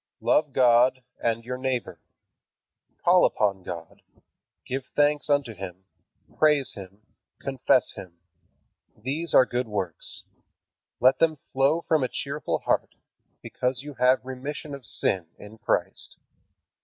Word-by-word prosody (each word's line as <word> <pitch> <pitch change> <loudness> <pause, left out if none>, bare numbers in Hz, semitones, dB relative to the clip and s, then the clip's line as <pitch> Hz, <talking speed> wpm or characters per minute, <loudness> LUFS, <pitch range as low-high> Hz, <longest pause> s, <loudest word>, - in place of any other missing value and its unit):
Love - - +2
God 125 +1 +4 0.2
and 115 0 0
your 125 +1 -4
neighbor. 130 -2 -3 1.0
Call - - +6
upon 100 -3 +2
God, 85 -2 -8 0.6
give 130 0 -4
thanks 145 0 +2
unto 140 -5 +2
Him, 95 -2 -8 0.5
praise 150 -3 +4
Him, 100 +2 -11 0.3
confess 135 -2 +2
Him. 85 -2 -11 0.8
These 140 +10 -2
are 130 - +8
good 125 0 -2
works. 95 -6 -2 0.8
Let 130 +2 +5
them 160 -1 +3 0.2
flow 140 +5 +3
from 160 -2 +3
a - - +2
cheerful 140 +4 -3
heart, - - 0 0.5
because 125 +1 -2
you 145 0 -8
have 130 +1 +4
remission 140 +3 -6
of 140 -2 -8
sin 90 -4 0
in 105 +2 -12
Christ." - - -1
125 Hz, 125 wpm, -26 LUFS, 105-140 Hz, 1.0 s, are